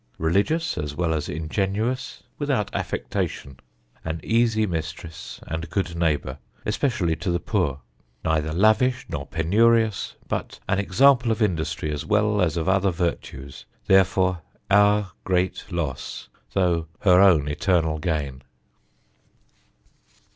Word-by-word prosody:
Religious 125 - +1
as 75 -1 -4
well 80 -1 0
as 75 -2 -2
Ingenuous, 100 - -2 0.2
without - - -1
Affectation. 70 -2 -3 0.4
An 80 0 -3
easie 115 -1 +2
Mistress, 80 -2 -6
and 80 0 -5
Good 95 -2 -2
Neighbour, 75 -5 -1 0.3
especially 105 - 0
to 90 - -3
the 85 0 +1
Poor. 70 -4 -1 0.4
Neither 80 -1 +1
lavish 115 - +3
nor 70 - -4
penurious, 110 +6 +2
but - - -4
an 100 - +1
Example 120 +5 +4
of 110 - -1
Industry 80 -7 -1
as 75 -1 -3
well 105 -1 +2
as 85 -2 +1
of 80 - -2
other 95 +1 +3
Vertues: 85 -6 -4 0.2
Therefore 95 -2 +3 0.3
our 105 -1 +4
great 95 +2 -1
Loss 80 -7 -4 0.2
tho' 85 -4 +1
her 90 -3 +6
own 85 -7 +5
Eternal 80 +1 +1
Gain." 75 -5 -2
90 Hz, 120 wpm, -24 LUFS, 80-105 Hz, 0.4 s, her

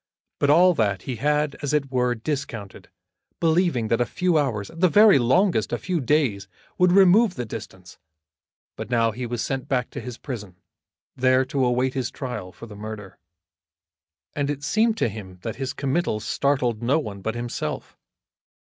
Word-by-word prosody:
But 145 - +2
all 180 +5 +6
that 100 - 0
he 125 -3 -4
had, 150 +3 0
as 145 0 -2
it 140 -3 0
were, 125 -1 +1
discounted, 115 -5 -5 0.5
believing 165 -8 +2
that 115 +2 +2
a - - +3
few 180 -2 0
hours, 120 -10 0
at 165 - -12
the 185 0 +4
very 210 -4 +6
longest 175 - +2
a - - 0
few 180 -2 -2
days, 120 -8 +1 0.3
would 180 0 +5
remove 195 +2 +5
the 125 - -4
distance; 95 -4 -10 0.8
but - - -7
now 115 -2 +2
he 120 +2 -5
was 120 -1 -3
sent 135 -1 -3
back 125 -3 -1
to - - -6
his 125 -1 -7
prison, 105 -9 -7 0.6
there 130 0 +3
to 135 0 -1
await 125 +1 +1
his 130 -3 -2
trial 120 -9 -6
for 115 - -11
the 105 -2 -11
murder. 105 -2 -8 1.1
And 145 -1 -1
it 145 -1 -3
seemed 220 +8 +2
to - - +1
him 95 -4 -8
that 115 0 -5
his 135 -1 -3
committal 140 -4 -1
startled 125 -1 0
no 130 +6 +2
one 105 -10 -5
but 110 +3 -3
himself. 120 0 -5
130 Hz, 175 wpm, -24 LUFS, 115-150 Hz, 1.1 s, all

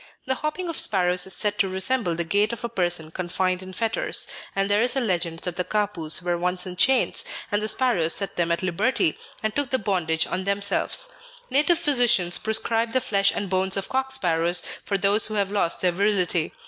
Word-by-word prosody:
The 260 - 0
hopping 305 +6 -4
of 335 - -1
sparrows 180 -2 +2
is 190 - +1
said 210 -1 -1
to 195 - +2
resemble 190 0 0
the 170 - -2
gait 205 +6 +1
of 235 - -7
a 235 - -3
person 175 -5 0
confined 185 +1 -2
in 185 0 -9
fetters, 225 +4 -1 0.3
and 195 0 +1
there 205 +1 +2
is 245 +2 +2
a - - +2
legend 175 -7 -2
that 180 -1 -4
the 180 - 0
Kapus 190 -6 -1
were 175 -1 -1
once 180 +1 0
in 180 -1 -6
chains, 265 +8 +2 0.3
and 205 0 +1
the 215 - -1
sparrows 215 -10 +2
set 195 - -2
them 170 -1 0
at 170 - -1
liberty, 185 0 0 0.3
and 215 0 -2
took 285 -3 0
the 260 - +1
bondage 175 -7 0
on 185 - -3
themselves. 200 - +1 0.4
Native 300 +6 +3
physicians 245 - +3
prescribe 225 +1 0
the 260 - +3
flesh 200 -4 +1
and 200 - -3
bones 190 +1 +1
of 195 - -4
cock 265 0 -1
sparrows 175 -7 +2 0.2
for 200 - -1
those 200 +2 +3
who 215 - -5
have 200 -1 0
lost 200 -5 +1
their 180 - +2
virility. 180 -3 0
195 Hz, 210 wpm, -24 LUFS, 180-225 Hz, 0.4 s, Native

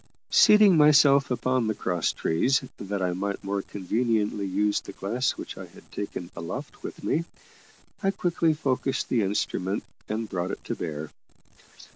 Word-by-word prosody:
Seating 210 -4 +7
myself 145 -2 +6
upon 125 -1 0
the 110 - 0
cross 90 -4 0
trees, 130 - +1 0.2
that 100 -1 -3
I 90 -1 0
might 100 +2 -3
more 100 0 -1
conveniently 105 +1 -1
use 105 +2 +1
the - - -10
glass 120 +8 -1
which - - -7
I - - -8
had - - -18
taken 90 -3 -5
aloft 125 - -6
with - - -8
me, 165 +2 0 0.8
I 195 - +2
quickly 170 -4 +1
focussed 135 -2 -1
the 120 - +2
instrument 100 0 -1 0.3
and 110 +1 -2
brought 90 -2 -3
it - - -6
to - - -3
bear. 75 -2 -5
105 Hz, 155 wpm, -26 LUFS, 95-135 Hz, 0.8 s, Seating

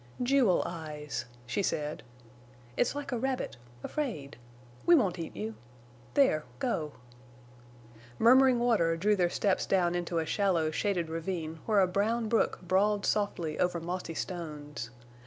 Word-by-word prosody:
"Jewel 245 -7 +3
eyes," 150 -6 -5 0.2
she 160 - -1
said. 150 -5 -2 0.7
"It's 245 - +1
like 290 -1 -5
a 245 - -1
rabbit—afraid. 150 - -4 0.5
We 345 - +6
won't 195 - +2
eat 165 - -6
you. 110 +2 -4 0.6
There—go." 170 - +1 1.2
Murmuring 255 +2 +6
water 215 -9 +2
drew 210 +5 +3
their 180 -3 +2
steps 195 +1 0
down 175 -3 +2
into 175 -1 -2
a 165 - +1
shallow 170 -4 +1
shaded 180 -1 0
ravine 165 -1 -4
where 210 -3 +4
a - - +5
brown 220 +5 0
brook 230 - +1
brawled 200 +3 +2
softly 175 -7 -1
over 180 -1 +1
mossy 175 0 -4
stones. 150 - -5
180 Hz, 130 wpm, -30 LUFS, 160-220 Hz, 1.2 s, We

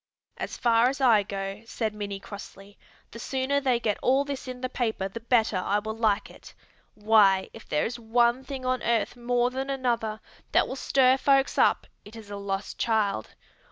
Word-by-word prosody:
"As - - -5
far 235 0 +4
as 275 - -5
I 235 -6 +5
go," 195 0 -5
said 220 -2 -3
Minnie 200 -2 -5
crossly, 200 0 -11 0.4
"the 230 - -9
sooner 265 +3 -1
they 255 -3 +2
get 215 -3 -1
all 270 +2 +3
this 280 -2 -5
in 250 0 -7
the 255 - -1
paper 225 -6 -2
the 195 +4 -8
better 230 -3 +2
I 195 +3 0
will 220 +1 -4
like 215 -2 +1
it. - - -15 0.4
Why, 210 -3 +4
if - - -13
there 150 - +1
is 240 +1 -4
one 235 +2 +2
thing 265 -2 -7
on 255 0 0
earth 235 -1 0
more 245 0 0
than 265 +1 -4
another 235 -5 -1 0.3
that - - +4
will - - -5
stir 265 -1 +3
folks 275 0 +2
up - - +3 0.2
it 210 - -13
is 215 -2 -11
a 205 - -5
lost 200 0 -4
child. 210 - 0
230 Hz, 190 wpm, -27 LUFS, 205-255 Hz, 0.4 s, I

